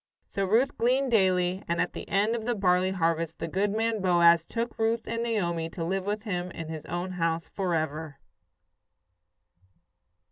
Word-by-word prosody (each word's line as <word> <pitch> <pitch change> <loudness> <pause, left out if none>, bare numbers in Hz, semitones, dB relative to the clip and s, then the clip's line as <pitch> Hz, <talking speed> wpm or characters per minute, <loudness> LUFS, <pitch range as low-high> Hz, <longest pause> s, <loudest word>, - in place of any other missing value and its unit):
So 195 - -2
Ruth 230 +8 +2
gleaned 255 +3 +2
daily, 185 -3 +2
and 170 0 -1
at 175 - 0
the - - -8
end 210 +4 +2
of 230 - -4
the 240 +1 0
barley 185 -2 +2
harvest 165 -3 0
the 165 - -4
good 195 +5 0
man 220 +1 0
Boaz 170 -2 +5
took 230 +7 -4
Ruth 225 +1 +1
and 230 0 -2
Naomi 170 -8 -1
to 165 0 -5
live 190 +2 -2
with 210 +1 -2
him 180 -5 -3
in 165 -2 -7
his 160 -2 -7
own 175 +2 -3
house 165 -2 -1
forever. 160 -5 -2
185 Hz, 170 wpm, -28 LUFS, 170-220 Hz, -, Boaz